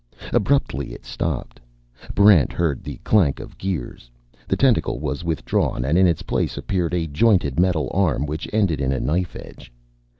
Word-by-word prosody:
Abruptly 100 - 0
it - - -12
stopped. - - -4 0.6
Barrent 100 -5 +6
heard 80 -7 -1
the 70 -3 -7
clank 90 -11 +3
of - - -10
gears. 80 -10 -5 0.4
The - - +1
tentacle - - +2
was 75 +1 -4
withdrawn, 80 -6 -1
and 75 +4 +1
in 95 +1 +5
its 85 -3 0
place - - -2
appeared 90 -3 -1
a 85 -2 0
jointed 80 - +2
metal 90 -4 +2
arm 85 -7 +1
which 75 +2 -5
ended 95 -10 +1
in 65 0 0
a 70 - -1
knife 90 +3 -1
edge. - - -11
80 Hz, 165 wpm, -22 LUFS, 70-95 Hz, 0.6 s, Barrent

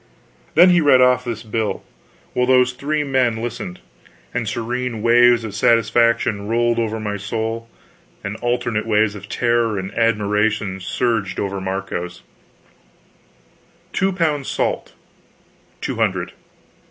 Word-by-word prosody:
Then 180 +3 +7
he 175 -1 +4
read 140 -4 +5
off 125 0 +4
this 115 -2 -5
bill, 110 -1 -2 0.5
while 125 0 +1
those 125 -1 +4
three 150 +4 -1
amazed 140 -2 -7 0.2
men 110 - -5
listened, 100 -6 -5 0.5
and - - -2
serene 120 -1 -3
waves 120 0 +5
of 110 -3 -6
satisfaction 115 -2 +2
rolled 120 +1 +1
over 110 -1 -1
my 105 -1 -3
soul 115 +3 -4 0.5
and 100 +1 -4
alternate 120 -2 -1
waves 105 -1 +2
of 105 0 -10
terror 120 -3 +1
and 95 0 -5
admiration 105 -3 0
surged 100 0 -1
over 100 -1 -3
Marco's: 95 -2 -4 1.7
2 190 0 +1
pounds 155 -6 0
salt............ - - -2
115 Hz, 120 wpm, -20 LUFS, 105-120 Hz, 1.7 s, Then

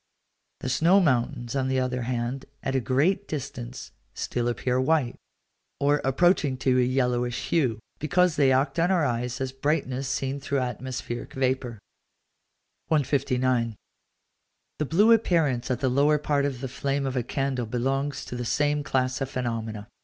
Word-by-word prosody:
The 130 - -3
snow 165 +10 +4
mountains, 125 -5 0
on 135 -1 0
the 130 0 +1
other 125 0 -1
hand, 120 +2 -3 0.2
at 135 - -1
a - - +3
great 155 - +1
distance, 130 -4 -6 0.2
still 120 -1 -2
appear 125 +1 0
white, 135 -3 +1 0.6
or 145 +1 +2
approaching 140 0 +2
to 130 0 +2
a - - +4
yellowish 125 -1 0
hue, 130 -10 +2 0.2
because 175 +2 +2
they 140 -2 +4
act 135 +6 +1
on 170 +2 +3
our 180 -5 +3
eyes 120 0 -2
as 130 -1 -2
brightness 135 -1 -1
seen 135 +1 -2
through 140 0 -2
atmospheric 125 -1 -4
vapour. 130 -3 -1 1.1
159. 130 -5 +1 1.0
The 150 - +1
blue 200 +10 +4
appearance 165 - +2
at 125 -1 -1
the 135 - +2
lower 145 +4 +3
part 145 -1 0
of 135 -3 -3
the 135 - -3
flame 140 +2 -2
of 135 -1 -2
a 125 - +1
candle 130 -1 -2
belongs 135 +4 -1
to - - -6
the 120 - -3
same 145 +4 +1
class 130 -1 0
of 135 - -1
phenomena. 115 -4 -4
130 Hz, 160 wpm, -26 LUFS, 125-145 Hz, 1.1 s, snow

